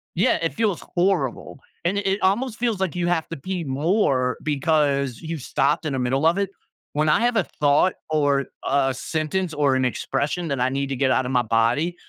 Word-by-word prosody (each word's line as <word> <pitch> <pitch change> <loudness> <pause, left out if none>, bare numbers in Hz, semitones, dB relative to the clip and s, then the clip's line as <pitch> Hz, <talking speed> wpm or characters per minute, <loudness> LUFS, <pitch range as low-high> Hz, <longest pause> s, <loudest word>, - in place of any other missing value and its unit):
Yeah, - - +3
it 165 - -1
feels 215 -6 0
horrible. 175 -8 0 0.3
And 185 +4 +1
it 200 - -5
it 195 +1 +1
almost 220 +5 +1
feels 230 -5 0
like 190 -4 -1
you 175 -1 -1
have 175 -2 0
to 165 - -5
pee 180 +4 -4
more 135 -3 +1
because 145 -4 +1
you 165 0 -4
stopped 140 +4 0
in 140 - -2
the 130 - -1
middle 130 +4 0
of 170 +4 +2
it. 200 -1 0 0.4
When 150 +1 +1
I 150 - +3
have 240 -1 +2
a 195 - +3 0.2
thought 150 +5 +4 0.2
or 145 -3 +2 0.2
a 135 -1 +2
sentence 160 +6 -2
or 145 -2 +2
an 130 0 +1
expression 150 +7 -2
that 135 -2 -1
I 130 - +2
need 135 +1 -2
to 135 - -2
get 130 0 +1
out 130 - +2
of 125 - -3
my 125 - +3
body, 115 +10 +1
150 Hz, 215 wpm, -23 LUFS, 135-180 Hz, 0.4 s, thought